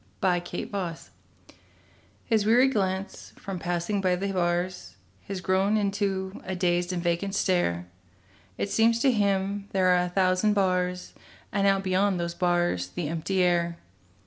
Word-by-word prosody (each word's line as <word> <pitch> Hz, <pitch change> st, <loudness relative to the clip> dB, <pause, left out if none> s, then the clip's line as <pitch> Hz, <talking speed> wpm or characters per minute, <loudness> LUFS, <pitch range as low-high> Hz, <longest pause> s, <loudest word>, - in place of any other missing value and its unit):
THE 180 Hz, -3 st, +2 dB
PANTHER 180 Hz, -2 st, -4 dB, 1.3 s
His 220 Hz, -3 st, +2 dB
weary 245 Hz, +5 st, +5 dB
glance, 195 Hz, -5 st, -3 dB
from 190 Hz, -2 st, -6 dB
passing 175 Hz, +4 st, -1 dB
by 185 Hz, -1 st, +2 dB
the 195 Hz, +2 st, -2 dB
bars, 175 Hz, -, -2 dB, 0.3 s
Has 195 Hz, -2 st, -4 dB
grown 190 Hz, +3 st, +2 dB
into 195 Hz, -2 st, -2 dB
a 190 Hz, -, -4 dB
dazed 175 Hz, 0 st, 0 dB
and 175 Hz, -2 st, -3 dB
vacant 175 Hz, +3 st, -1 dB
stare; 175 Hz, -, +1 dB, 0.7 s
It 200 Hz, -, -2 dB
seems 225 Hz, +1 st, +3 dB
to 270 Hz, -, +4 dB
him 200 Hz, -2 st, 0 dB
there 185 Hz, -1 st, +3 dB
are 180 Hz, 0 st, +4 dB
a 180 Hz, -, -3 dB
thousand 185 Hz, +3 st, +2 dB
bars 180 Hz, -2 st, 0 dB, 0.4 s
And 200 Hz, 0 st, +1 dB
out 195 Hz, 0 st, +2 dB
beyond 190 Hz, 0 st, +1 dB
those 170 Hz, 0 st, -2 dB
bars 175 Hz, -, 0 dB
the 150 Hz, -, -4 dB
empty 175 Hz, +3 st, 0 dB
air. 170 Hz, -1 st, +1 dB
185 Hz, 145 wpm, -27 LUFS, 175-200 Hz, 1.3 s, weary